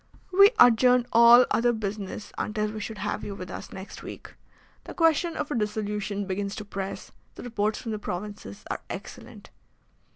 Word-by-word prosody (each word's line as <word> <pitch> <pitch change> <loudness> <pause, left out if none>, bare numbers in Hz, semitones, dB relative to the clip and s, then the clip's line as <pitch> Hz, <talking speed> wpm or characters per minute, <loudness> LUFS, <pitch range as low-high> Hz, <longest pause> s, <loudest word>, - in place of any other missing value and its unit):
"We 395 +2 +8
adjourned 245 +1 +6
all 235 +2 +8
other 240 +1 +3
business 210 -2 -5
until 210 -1 -2
we 215 - -6
should 215 +1 -6
have 205 +1 -3
you 200 - -5
with 180 -1 -8
us - - -8
next 190 +1 -9
week. - - -10 0.5
The - - -9
question 330 0 +2
of 300 0 -3
a - - -1
dissolution 210 -2 -2
begins 200 +1 -3
to 210 - -7
press. 195 -1 -6 0.2
The - - -9
reports 215 -3 -1
from 225 - -5
the 215 - -3
provinces 200 - -7
are - - -4
excellent." - - -9
210 Hz, 170 wpm, -26 LUFS, 200-240 Hz, 0.5 s, We